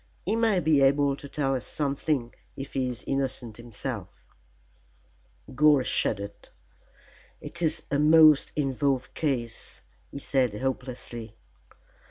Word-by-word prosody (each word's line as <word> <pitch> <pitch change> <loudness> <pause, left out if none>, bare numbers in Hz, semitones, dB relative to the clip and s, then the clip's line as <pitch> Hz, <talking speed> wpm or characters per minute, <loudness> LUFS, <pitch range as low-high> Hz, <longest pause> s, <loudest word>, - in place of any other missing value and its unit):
He 210 - +1
may 225 -4 +3
be 155 -4 +3
able 140 +1 +3
to 140 0 -11
tell 135 -2 -1
us 130 - -2
something 140 -3 -2 0.2
if 135 0 -7
he 130 -1 0
is 125 -1 -6
innocent 130 -5 -2
himself." 120 -2 -7 1.2
Gore 145 0 +5
shuddered. 100 -4 -2 0.9
"It 170 - -5
is 160 -2 +1
a 140 - +1
most 155 -1 +6
involved 135 -2 0
case," 125 -7 -3 0.3
he - - -8
said 130 -5 0
hopelessly. 120 -2 -5
135 Hz, 120 wpm, -27 LUFS, 125-150 Hz, 1.2 s, most